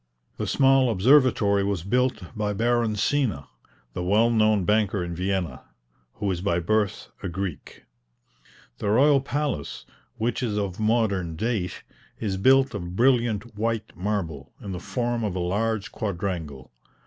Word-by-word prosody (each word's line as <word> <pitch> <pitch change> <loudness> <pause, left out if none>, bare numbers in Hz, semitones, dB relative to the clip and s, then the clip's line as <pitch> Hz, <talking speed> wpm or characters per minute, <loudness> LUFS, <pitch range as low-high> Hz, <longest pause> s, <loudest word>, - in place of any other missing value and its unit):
The - - -3
small 135 -2 +4
observatory 110 -2 +4
was 100 -4 -1
built 120 -2 -1
by 105 -1 -1
Baron 115 +1 +1
Sina, 105 - 0 0.5
the - - -4
well 110 +6 +3
known 110 -4 +3
banker 105 -2 +1
in 85 0 -4
Vienna, 90 -5 -2 0.5
who 100 -2 -2
is 90 -2 -3
by 90 -3 +1
birth 105 +2 0
a 95 - -3
Greek. 90 -3 -6 1.0
The 100 - -1
royal 135 +5 +5
palace, 140 - -3 0.3
which 115 +3 -1
is 110 -4 -1
of 100 -2 -3
modern 105 -7 +1
date, 105 -1 -2 0.4
is 100 -4 -2
built 135 +5 +4
of 90 -3 -5
brilliant 120 -2 +2
white 115 +1 -2
marble, 85 -8 -3
in 100 - -7
the 90 - -4
form 120 +2 -2
of 100 -4 -2
a - - -2
large 105 +4 -1
quadrangle. 90 - -4
105 Hz, 145 wpm, -25 LUFS, 95-120 Hz, 1.0 s, royal